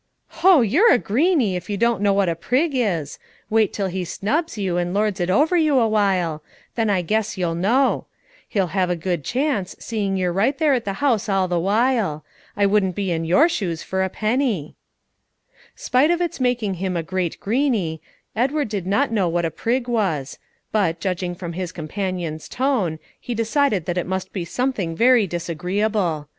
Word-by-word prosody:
"Ho! 350 -3 +6
you're 330 - +4
a - - +6
greeney, 250 - +1
if 180 +1 -6
you 205 - -1
don't 235 -2 +1
know 205 -1 +3
what 195 -1 +2
a 170 - +1
prig 255 - 0
is. 180 - -1 0.3
Wait 220 -2 +3
till 200 - -2
he 185 0 -3
snubs 265 - -2
you 190 -4 -1
and 175 +1 -1
lords 210 -1 0
it 175 0 -1
over 300 - +3
you 310 -5 +3
awhile; 195 -9 +1 0.3
then 225 -2 0
I 190 -3 +1
guess 215 +3 -1
you'll 175 -2 -1
know. 230 +11 +1 0.4
He'll 190 -7 -1
have 185 -2 +1
a 180 - +1
good 175 -2 -2
chance, 250 - -1
seeing 200 -4 -2
you're 180 -2 0
right 230 +10 +1
there 310 -3 +3
at 245 -3 -1
the 200 - -2
house 225 -6 +1
all 195 -1 +2
the 175 -1 0
while. 205 - +1 0.3
I 200 - +3
wouldn't 195 -3 +2
be 195 -3 -2
in 165 -1 -1
your 275 - +5
shoes 175 - -3
for 190 0 -2
a 190 - 0
penny." 215 - -1 1.0
Spite 260 +5 +2
of 345 0 +2
its 345 -5 -2
making 245 -5 0
him 185 -2 -1
a 165 - -2
great 185 0 -3
greeney, 215 - 0 0.4
Edward 275 +3 0
did 200 -4 -4
not 230 +7 +1
know 195 -6 +1
what 170 0 0
a 165 - -1
prig 245 +6 -1
was; 190 - -1 0.3
but, 175 -6 +1
judging 180 -1 -2
from 175 -1 -6
his 180 0 -4
companion's 170 -1 -4
tone, 240 - 0 0.2
he 240 - -5
decided 230 - +1
that 175 +2 -1
it - - -4
must 190 0 -4
be 180 -4 -3
something 205 -5 -2
very 235 0 +4
disagreeable. 175 0 -1
200 Hz, 190 wpm, -22 LUFS, 175-240 Hz, 1.0 s, Ho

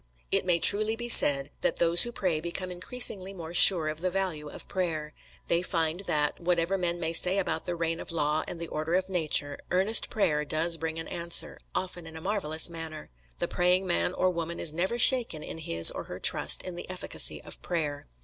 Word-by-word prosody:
It - - -2
may 175 -2 +2
truly 215 +5 +7
be 240 +1 -7
said 140 -9 +7
that - - 0
those 170 0 +5
who 240 - +3
pray 180 -8 -4
become 180 +2 -7
increasingly 195 0 0
more 165 -2 -10
sure 175 -3 +9
of 155 +1 -6
the 185 - -2
value 175 -5 -3
of - - -9
prayer. 160 -5 -6 0.3
They 170 0 -1
find 165 -2 -3
that, 150 -1 -2
whatever 175 +1 -2
men 175 -2 -4
may 165 -1 -4
say 180 +3 +3
about 195 - -4
the 175 - -5
reign 165 0 -4
of - - -8
law 155 -1 -2
and 175 - -8
the 170 - -7
order 155 +3 -5
of 185 +1 -3
nature, 155 -5 -3
earnest 190 +5 +2
prayer 150 -8 -2
does 165 +3 0
bring 160 0 -7
an 165 - -8
answer, 170 0 +1 0.2
often 180 -2 -6
in 160 0 -12
a - - -9
marvellous 160 -5 -1
manner. 160 - -9 0.3
The - - -4
praying 180 +2 -1
man 85 - -2
or 185 - -2
woman 170 -1 -7
is 155 - 0
never 185 +8 -4
shaken 240 - +1
in - - -10
his 85 - +4
or - - -9
her - - -10
trust - - +1
in 185 - -8
the 175 - -10
efficacy 185 -1 -1
of - - -10
prayer. 150 -5 -6
170 Hz, 210 wpm, -25 LUFS, 160-185 Hz, 0.3 s, sure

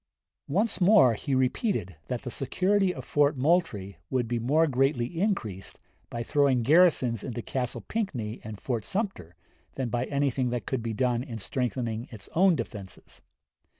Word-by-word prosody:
Once 195 +4 0
more 180 - +6
he 130 +5 -2
repeated 130 - 0
that 125 0 -3
the 125 - -5
security 190 - +1
of - - -8
Fort 145 0 +2
Moultrie 125 - 0
would 125 -3 0
be 120 0 -1
more 145 +8 +3
greatly 135 -3 +1 0.2
increased 115 - -2 0.3
by 120 0 -4
throwing 135 -2 +2
garrisons 140 - +4
into 120 -3 -5
Castle 125 -2 -3
Pinckney 125 - -3
and 105 -2 -7
Fort 120 -5 -2
Sumter 190 - -3 0.4
than 130 -3 -2
by 120 +2 -1
anything 140 -3 0
that 120 0 -3
could 130 -3 -2
be 115 -1 -3
done 120 +1 +1
in 125 -4 -6
strengthening 120 0 -3
its 110 -4 -11
own 185 +1 +5
defenses. 100 -10 -8
130 Hz, 155 wpm, -28 LUFS, 115-160 Hz, 0.4 s, more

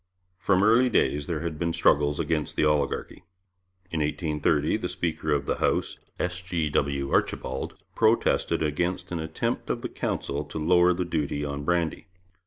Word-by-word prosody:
From 95 -1 +3
early 115 +4 +5
days 75 -10 +1
there 80 -3 -2
had 80 -3 -4
been 85 -1 0
struggles 75 -1 +3
against 80 -1 -1
the - - +2
oligarchy. 75 -2 0 0.7
In 80 - -1
1830 75 0 +1
the - - -4
speaker 80 -2 -2
of 70 -1 +1
the - - -1
House, - - 0 0.2
S. 90 0 -2
G. 85 -4 -2
W. 70 -1 0
Archibald, 65 +1 -1 0.2
protested 110 -6 +2
against 90 +4 -1
an 85 - -2
attempt 80 0 -3
of - - -2
the - - -3
Council 70 +2 -3
to 75 - -7
lower 90 +3 +4
the 90 - -1
duty 75 -3 -2
on 70 0 -4
brandy. 85 +2 -1
80 Hz, 165 wpm, -26 LUFS, 75-90 Hz, 0.7 s, early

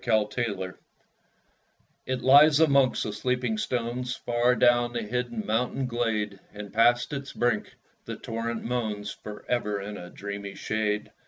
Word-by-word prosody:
Mountain 110 0 +1
Moss 95 -1 -5 1.3
It 130 -1 -1
lies 145 +3 +7
amongst 140 -5 +4
the 105 - -3
sleeping 120 0 -1
stones, 125 +2 -2
Far 120 +1 +1
down 120 0 +3
the 120 -1 -2
hidden 120 0 -3
mountain 125 +4 0
glade; 110 -5 -1
And 105 -1 -9
past 120 +4 +3
its 140 -1 -5
brink 120 -3 0 0.3
the - - -5
torrent 115 0 -4
moans 110 -4 -2
For 105 0 -9
ever 105 -4 0
in 100 +1 -6
a 90 - -9
dreamy 100 0 -6
shade. 105 0 -2
115 Hz, 145 wpm, -27 LUFS, 105-125 Hz, 1.3 s, lies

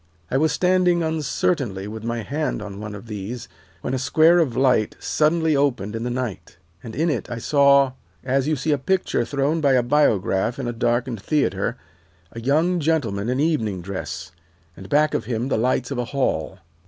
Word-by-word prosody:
I 135 - +2
was 155 +2 +2
standing 180 -2 +2
uncertainly 145 - -1
with 110 +1 -7
my 115 -1 -3
hand 150 +5 -2
on 100 -1 -8
one 105 -1 -6
of 105 - -10
these 115 +3 -6 0.3
when 125 - -3
a 130 - 0
square 160 +8 +4
of 130 -8 0
light 125 -5 +2
suddenly 160 0 +2
opened 125 -7 0
in 115 - -3
the 120 - -2
night, 120 -8 -5 0.2
and 110 - -8
in 160 +3 +1
it 130 - -3
I 120 - -4
saw, 140 +1 +4 0.3
as 135 +1 0
you 155 - +2
see 145 +3 -1
a 145 - +2
picture 180 -5 0
thrown 145 +5 0
by 140 -3 +4
a 125 -2 +3
biograph 115 -5 +2
in 135 -3 -3
a 120 - -2
darkened 120 -1 -1
theatre, 115 -5 0 0.5
a 115 - -8
young 160 +8 +2
gentleman 120 -10 0
in 130 +1 0
evening 110 - 0
dress, 80 -4 -6 0.4
and 95 - -11
back 150 +1 +3
of - - -1
him 120 +2 -2
the - - +1
lights 125 +1 0
of - - -2
a 125 - -1
hall. 105 - -1
130 Hz, 190 wpm, -22 LUFS, 110-150 Hz, 0.5 s, square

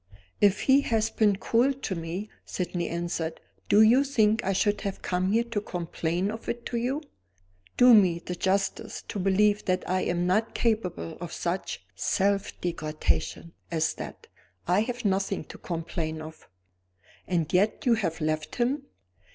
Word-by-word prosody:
"If 205 -1 +4
he 270 +1 +5
has 225 -4 0
been 210 -3 +3
cruel 235 +7 +2
to 265 -7 -4
me," 175 +5 -5
Sydney 175 -1 -3
answered, 170 -1 -3 0.3
"do 215 - +7
you 245 +5 +6
think 225 -6 +2
I 195 - +1
should 205 +2 +1
have 200 -1 -4
come 185 +1 0
here 230 +2 +3
to 235 -3 -3
complain 175 +1 -2
of 225 +1 -7
it 235 0 -4
to - - +1
You? 260 +6 -1 0.7
Do 245 0 +8
me 185 -6 +6
the 175 +1 -6
justice 190 +2 -1
to 205 - -3
believe 205 +2 +3
that 185 0 0
I 185 0 +1
am 175 0 0
not 210 +5 +1
capable 190 - -1
of 175 -2 -5
such 170 - -3
self 195 - 0
degradation 160 0 -2 0.2
as 160 -1 +1
that. - - -8 0.4
I 180 +3 +4
have 245 +2 -2
nothing 195 0 0
to - - -12
complain 165 -2 -4
of." 155 0 -11 0.8
"And 170 -4 -1
yet 200 +4 +2
you 245 - +5
have 180 -8 -1
left 155 0 -2
him?" 265 +3 0
195 Hz, 160 wpm, -27 LUFS, 170-220 Hz, 0.8 s, Do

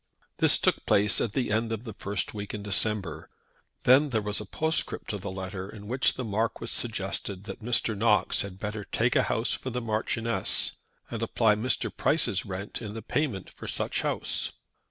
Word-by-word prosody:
This - - +6
took - - +1
place 100 -1 +4
at 110 - -1
the 125 -4 0
end 110 +1 +1
of 115 0 -3
the 115 -3 -7
first 100 -2 -2
week 105 0 -5
in 105 - -6
December. 100 -6 0 0.5
Then 135 +4 +6
there 115 -4 +1
was 105 0 -1
a 105 - -8
postscript 160 +8 0
to 105 - -3
the 100 +1 -5
letter 95 0 -5
in 105 -1 -10
which 130 +3 +3
the 130 - -3
Marquis 110 +1 -1
suggested 100 -3 -1
that 110 - -7
Mr. 115 -1 +2
Knox 105 -2 +3
had 95 -2 -6
better 105 +1 -4
take - - +1
a - - +6
house - - +1
for 130 - -3
the 125 0 -2
Marchioness, 115 0 0 0.4
and - - -4
apply 110 -2 +3
Mr. 110 +5 0
Price's 130 - +2
rent 100 +4 -5
in 105 -2 -6
the 115 - -6
payment 125 - -1
for - - -9
such - - 0
house. - - 0
105 Hz, 190 wpm, -28 LUFS, 100-115 Hz, 0.5 s, This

